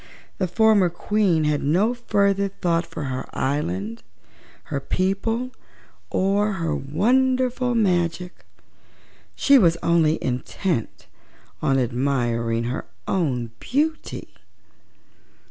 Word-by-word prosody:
The 185 - +1
former 205 0 +4
Queen 180 -2 +1
had 150 -1 +1
no 185 - +2
further 200 -4 +1
thought 170 -3 -1
for - - -6
her 130 -2 -4
island, 115 -6 -2 0.7
her 140 - 0
people, 195 - -1 0.6
or 200 +2 +1
her 165 -4 -2
wonderful 250 - +1
magic; 180 -4 0 0.9
she 280 -1 +5
was 170 -5 +4
only 165 -2 +3
intent 125 - -2 0.6
on 135 - +2
admiring 120 -2 0
her 120 +3 -4 0.2
own 125 -11 -1
beauty. 305 +5 -2
175 Hz, 95 wpm, -23 LUFS, 135-210 Hz, 0.9 s, she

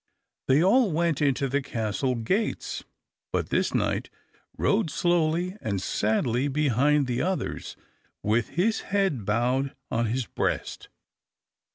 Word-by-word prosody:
They 135 +5 +4
all 220 +2 +4
went 165 -2 +1
into 140 -1 +2
the 140 +2 0
castle 125 0 -1
gates; 190 - -1 0.5
but - - -1
this - - +1
knight - - 0 0.5
rode 200 -4 +2
slowly 175 +2 +1
and 100 -3 -1
sadly 115 +7 0
behind 145 0 +2
the 125 0 -1
others, 185 +1 -2 0.5
with 110 +2 +1
his 215 +5 +2
head 195 - +1
bowed 125 +6 0 0.2
on 115 0 +1
his 125 +3 -1
breast. - - -3
140 Hz, 125 wpm, -26 LUFS, 120-175 Hz, 0.5 s, They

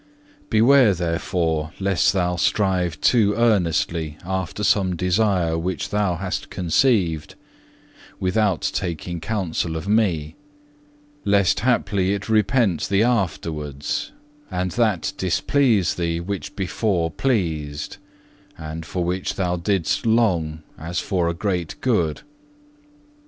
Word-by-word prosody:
4. - - -29
"Beware, 120 0 +5
therefore, 85 -2 -1
lest 95 -2 +2
thou 90 -2 0
strive 90 -2 +1
too 105 -4 +3
earnestly 85 -8 +1
after 95 +2 -3
some 95 -3 +2
desire 90 -2 +1
which 90 +2 -3
thou 100 -4 +1
hast 90 +2 -4
conceived, 90 - +1 0.8
without 95 -1 +1
taking 85 0 -3
counsel 85 -3 -2
of 80 +3 -5
Me; 90 -8 +1 0.9
lest 100 -3 +3
haply 100 -5 +1
it 100 +2 -6
repent 110 -4 +2
thee 100 +2 +3
afterwards, 80 - -2 0.4
and 90 -1 -2
that 110 -5 0
displease 100 - +2
thee 85 -1 -2
which 95 +3 -5
before 95 -3 -1
pleased, 80 - -2 0.6
and 80 +1 -7
for 90 - -2
which 90 +2 -2
thou 90 -2 0
didst 90 +5 0
long 85 -9 +1 0.2
as 85 +3 -3
for 90 -4 0
a 85 - -3
great 90 -3 -2
good. 90 -12 0
90 Hz, 115 wpm, -22 LUFS, 85-105 Hz, 0.9 s, Beware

